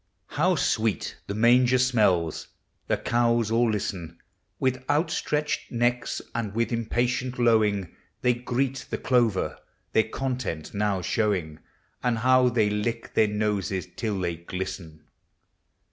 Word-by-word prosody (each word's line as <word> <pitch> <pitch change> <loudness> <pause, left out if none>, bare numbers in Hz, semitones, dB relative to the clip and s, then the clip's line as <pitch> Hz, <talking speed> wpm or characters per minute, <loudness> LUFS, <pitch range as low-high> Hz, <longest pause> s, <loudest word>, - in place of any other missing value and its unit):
How - - +2
sweet 110 -2 0
the 100 - -3
manger 125 +3 +5
smells! 105 -11 +2 0.4
The - - +1
cows 115 -2 +1
all 115 +1 +3
listen 90 -5 -3 0.4
With 130 0 0
outstretched 150 0 0
necks, 120 +1 0
and 110 -3 -3
with 115 +1 0
impatient 125 +2 -1
lowing; 110 -6 +2 0.3
They 125 -1 +4
greet 125 +1 -2
the - - -2
clover, 115 -10 +1 0.3
their 110 0 +3
content 125 - -3
now 100 -3 0
show 105 +1 +1
ing— 80 -4 -6 0.4
And 125 -2 +1
how 130 +1 +4
they 115 -3 +2
lick 110 +3 -2
their 110 - +4
noses 105 -3 -1
till 105 -4 -2
they 85 -2 -2
glisten 90 -2 -6
115 Hz, 130 wpm, -26 LUFS, 100-125 Hz, 0.4 s, manger